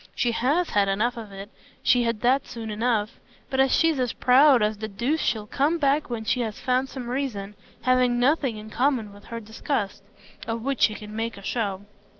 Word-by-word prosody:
She 240 - +1
HAS 290 +10 +1
had 205 -1 +3
enough 215 +5 0
of 220 -3 -8
it, 195 +1 -9 0.3
she 245 - +4
had 230 -2 -1
that 260 +3 +2
soon 225 -2 -6
enough; 215 -1 -1 0.3
but 265 - -1
as 270 0 +4
she's 325 -4 +3
as 250 -2 0
proud 260 -1 +5
as 210 0 0
the 220 - -3
deuce 240 +10 -1
she'll 215 -7 -1
come 285 +9 +1
back 285 -1 +1
when 230 -2 -4
she 250 - +1
has 220 -3 -3
found 255 +1 0
some 255 -3 -7
reason 240 -6 -3 0.3
having 250 -1 +3
nothing 265 -3 +2
in 215 0 -10
common 245 -6 0
with 205 0 -15
her 230 0 -6
disgust 220 -1 -3 0.5
of 225 0 -3
which 275 -1 -2
she 210 +1 +4
can 210 0 -9
make 225 -1 -3
a 200 - -11
show. 200 -2 -2
235 Hz, 205 wpm, -25 LUFS, 210-265 Hz, 0.5 s, proud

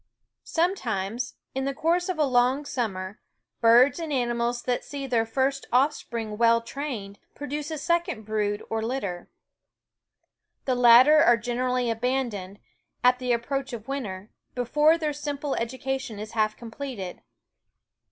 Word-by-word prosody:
Sometimes, 245 - -1 0.2
in 265 0 -2
the 275 0 -2
course 345 +4 +1
of 365 - -1
a 305 - +3
long 255 +2 +2
summer, 200 -7 -4 0.4
birds 240 +6 +5
and 325 -2 -4
animals 240 -2 0
that 245 -1 -1
see 280 -1 -6
their 235 -4 +1
first 270 +3 -1
offspring 235 -5 0
well 230 0 +5
trained 230 -5 -6 0.2
produce 290 +1 -4
a 315 - -4
second 340 - -1
brood 210 -1 -1
or 225 0 -2
litter. 220 -7 -4 1.4
The 260 - +1
latter 250 +5 +7
are 240 -7 +6
generally 245 +1 -1
abandoned, 225 -5 -2 0.5
at 250 0 +5
the 250 -1 -1
approach 270 +3 -1
of 225 -2 -7
winter, 215 -8 -5 0.2
before 295 +6 +3
t 305 -2 -2
simple 290 -1 -3
education 260 0 -3
is 215 +1 -7
half 215 -1 0
completed. 230 -5 -7
250 Hz, 135 wpm, -26 LUFS, 225-280 Hz, 1.4 s, latter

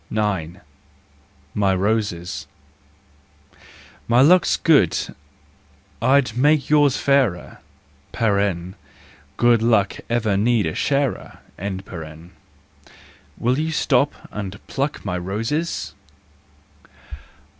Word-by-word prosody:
9 95 -6 -2 0.9
My 100 -2 +1
Roses. 100 -3 -2 1.6
My 120 +1 +3
luck's 175 +6 +5
good—I'd 130 - -1
make 145 +2 +2
yours 145 -3 +4
fairer, 130 -11 0 1.8
(Good 120 -2 +4
luck 110 -4 +2
ever 110 -4 +1
needs 110 -4 +2
a - - -6
sharer). 140 -2 -1 2.0
Will 125 +4 0
you 160 +1 -1
stop 140 -2 +1 0.2
and 100 -2 -6
pluck 140 -2 -3
my 90 -3 -2
roses 115 - -3
115 Hz, 75 wpm, -21 LUFS, 100-140 Hz, 2.0 s, luck's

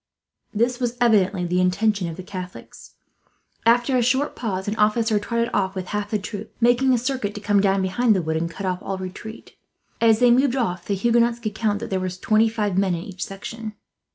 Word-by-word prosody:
This 240 +3 0
was 245 -1 -2
evidently 200 -6 +3
the 180 +1 +1
intention 190 0 +1
of 165 - -6
the 185 - -7
Catholics. 185 -1 -9 0.7
After 240 +3 +4
a 250 - +3
short 260 +4 +1
pause 190 -5 -3
an 210 - -1
officer 215 0 +2
trotted 235 +2 -1
off 190 0 0
with 185 -1 -5
half 205 0 -2
the 215 - 0
troop, 205 +1 -7
making 245 +2 +4
a 250 - +4
circuit 245 -4 -2
to - - -5
come 205 -1 +2
down 195 -1 +2
behind 215 +4 +2
the 185 - +1
wood 160 0 -1
and 165 +1 -2
cut 195 +4 -7
off 185 -1 -2
all 195 - -4
retreat. 190 +4 -8 0.5
As 225 -1 +5
they 245 +1 +5
moved 260 +1 +3
off, 185 -9 -2
the 200 - 0
Huguenots 235 +3 +2
could 215 -3 -4
count 215 -2 0
that 230 - -6
there 190 - +1
were 185 0 -2
twenty 215 +5 +2
five 210 -4 -1
men 190 -3 +1
in 170 - -5
each 190 -3 -6
section. 215 +2 -7
210 Hz, 215 wpm, -23 LUFS, 190-235 Hz, 0.7 s, As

